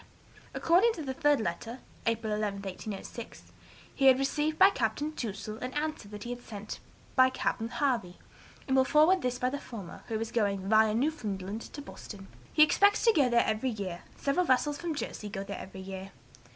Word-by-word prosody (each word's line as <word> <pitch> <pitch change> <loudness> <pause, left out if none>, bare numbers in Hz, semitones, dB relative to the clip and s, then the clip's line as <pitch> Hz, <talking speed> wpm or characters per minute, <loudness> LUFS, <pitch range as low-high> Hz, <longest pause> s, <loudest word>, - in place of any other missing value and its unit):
According 380 +8 +4
to 320 - -6
the 265 -2 -3
third 290 +1 +3
letter 220 +5 -3 0.3
(April 225 -1 0
11, 205 -2 -2
1806), 200 +4 -7 0.4
he 275 - 0
had 260 -1 +8
received 295 +3 0
by 385 +1 +8
Capt. 225 - 0 0.2
Touzel 215 -1 -5
an 255 +1 -5
answer 310 +1 -1
to - - -12
that 205 0 -8
he 245 +1 -4
sent 215 -3 -8 0.4
by 260 0 +6
Capt. 260 - -1
Harvey, 235 -11 0 0.5
and 265 - +2
will 265 - +6
forward 310 +7 +4
this 250 0 -1
by 250 0 0
the 285 - -3
former, 205 -11 -9
who 220 -1 -2
is 225 +1 -4
going 200 -5 0
via 220 0 +4
Newfoundland 220 -7 -2
to 290 - -8
Boston. 200 -7 -10 0.3
'He 305 - +7
expects 405 +6 +4
to 455 - +6
go 280 -8 +4
there 235 0 +4
every 220 +4 0
year; 195 -6 -4 0.2
several 335 +6 +1
vessels 285 +3 +2
from 335 -2 -3
Jersey 210 -6 -5
go 195 -1 -4
there 200 0 -6
every 190 0 -9
year.' 190 0 -7
235 Hz, 190 wpm, -30 LUFS, 205-285 Hz, 0.5 s, had